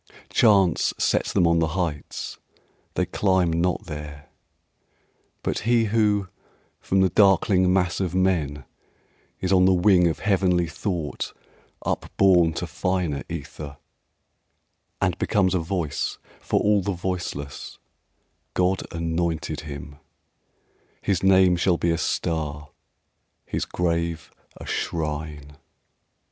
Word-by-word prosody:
Chance 100 -7 +4
sets - - +1
them 90 - +3
on 85 0 +3
the 80 +2 -1
heights, 80 -5 -4 0.6
they 90 - +1
climb 90 -2 +1
not 85 +2 0
there! 75 -2 -8 1.1
But - - -1
he 115 0 +2
who 105 -3 +2 0.5
from 95 0 +1
the 95 - +4
darkling 95 -1 +4
mass 90 -1 +1
of 90 -2 -2
men 80 -7 0 0.8
Is 95 +1 +1
on 90 -1 +5
the 95 0 +5
wing 90 -1 +5
of 80 - -1
heavenly 90 -4 +2
thought 85 -1 -4 0.5
upborne 90 -4 +3
To 85 - -3
finer 90 -4 -1
ether, 70 -2 -7 1.2
and - - +1
becomes 95 -3 +2
a 90 - +2
voice 80 -3 -2 0.2
For - - 0
all 105 -1 +3
the 100 +1 -2
voiceless, 90 -6 -5 0.8
God 90 +1 +2
anointed 85 -1 -2
him: 70 -1 -8 1.1
His 95 -4 +1
name 95 -1 +5
shall 90 0 +2
be 85 - +1
a 85 - 0
star, 75 -3 -2 0.7
his - - -2
grave 85 -2 -2 0.3
a - - -9
shrine. 75 -2 -4
90 Hz, 115 wpm, -24 LUFS, 80-95 Hz, 1.2 s, on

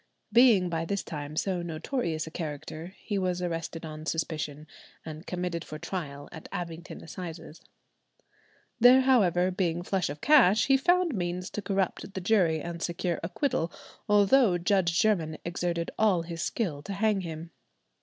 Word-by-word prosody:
Being 230 -6 +6
by 165 -1 -2
this 200 +4 -2
time 150 -1 -6
so 180 +2 -1
notorious 165 - -2
a 160 - -9
character, 155 +3 -6
he 205 -2 -3
was 180 -1 -1
arrested 165 -2 -4
on 155 0 -8
suspicion, 155 -2 -3 0.4
and 155 +2 -8
committed 180 -2 -3
for 155 - -8
trial 145 -5 -5
at 160 - -10
Abingdon 175 -2 -6
Assizes. 165 -1 -8 1.2
There, 250 +3 +8
however, 185 -9 +3
being 175 -2 -1
flush 185 -2 -1
of 145 +1 -6
cash, 225 - +5
he 270 - +5
found 350 +3 +3
means 180 -2 -3
to 210 - -4
corrupt 195 -1 -2
the 190 - -3
jury 180 -5 +3
and 170 0 -6
secure 170 0 -2
acquittal, 170 - -1 0.4
although 205 0 +5
Judge 175 -1 +2
Jermyn 165 -8 +1
exerted 170 -1 -2
all 200 -6 +3
his 165 0 -6
skill 170 -11 -2
to 200 +6 -6
hang 205 0 +1
him. 165 -1 -7
175 Hz, 155 wpm, -28 LUFS, 165-200 Hz, 1.2 s, There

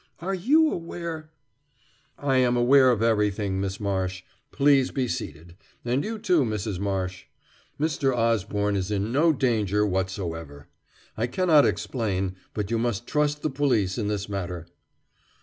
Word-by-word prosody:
Are 185 +3 -3
you 295 - +3
aware 165 -2 -5 0.5
" 135 +2 -37 0.2
"I - - +4
am 125 -1 +3
aware 130 +2 +6
of 115 -3 +2
everything, 105 -3 +1
Miss 95 0 -3
Marsh. 95 -2 -2 0.3
Please 140 -2 +3
be 130 -3 -1
seated; 85 -4 -6 0.3
and 125 +3 0
you, 225 +1 -4
too, 185 -7 +2
Mrs. 105 -5 -2
Marsh. 95 -2 -3 0.5
Mr. 145 -3 +1
Osborne 105 -4 0
is 95 0 -2
in 105 +1 -1
no 155 +6 +4
danger 110 - +1
whatsoever. 90 -6 -4 0.5
I 115 +2 -1
cannot 155 +2 +4
explain, 95 -6 -2 0.2
but 105 0 -3
you 115 - +1
must 120 -1 -1
trust 150 +1 0
the 155 - 0
police 120 -9 +1
in 105 - -1
this 105 -1 -2
matter." 90 -4 -4
115 Hz, 150 wpm, -25 LUFS, 95-140 Hz, 0.5 s, aware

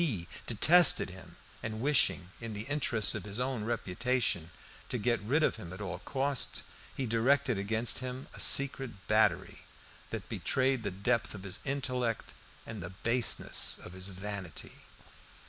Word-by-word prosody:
He 110 - -1 0.2
detested 155 - +6
him, 90 -2 -12 0.3
and 110 0 -5
wishing, 125 -9 +2
in 115 -1 -5
the 105 +1 -5
interests 130 -5 +1
of 110 -4 -5
his 105 +2 -4
own 125 -4 -2
reputation, 115 -4 -1 0.4
to - - -2
get 120 -1 0
rid 140 +10 +1
of - - +1
him 90 -6 -9
at 90 - -9
all 90 -4 -5
costs, 140 -1 -1 0.3
he 135 - -1
directed 125 +1 +2
against 110 +3 +1
him 130 +1 -6
a - - -10
secret 135 -7 +4
battery, 110 +1 +2 0.5
that - - -6
betrayed 130 -1 0
the 100 - -2
depth 105 +5 -1
of 100 - -9
his 100 -2 -4
intellect 125 -4 -2 0.3
and 110 -3 -7
the 85 - -6
baseness 115 +5 +1
of 90 - -10
his 95 +1 -4
vanity. 95 -3 -7
115 Hz, 155 wpm, -31 LUFS, 100-130 Hz, 0.5 s, detested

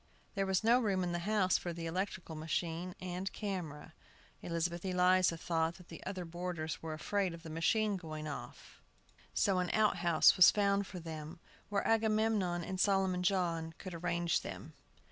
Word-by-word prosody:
There 195 -1 -1
was 190 +2 +1
no 235 +3 +5
room 195 -6 +1
in 175 - -1
the 175 +3 -3
house 200 -4 +3
for 175 - -4
the 165 0 -6
electrical 180 0 -3
machine 165 +3 -3
and 185 +1 -4
camera. 180 -8 -5 0.5
Elizabeth 170 0 -2
Eliza 185 -2 +3
thought 165 0 0
the 165 - -9
other 185 -2 -4
boarders 170 -2 -4
were 160 -1 -4
afraid 190 +2 -1
of 165 - -13
the 160 - -8
machine 205 +6 +1
going 155 -3 -6
off; 140 - -8 0.5
so 195 -2 +3
an 180 -1 -1
out 215 -1 +3
house 170 -2 +5
was 185 - +10
found 200 -1 +2
for 185 - -7
them, 160 0 -7 0.3
where 200 -1 0
Agamemnon 215 -5 +2
and 185 +2 -4
Solomon 190 -2 +2
John 170 -4 0
could 185 - -8
arrange 170 0 0
them. - - -8
180 Hz, 165 wpm, -34 LUFS, 165-195 Hz, 0.5 s, was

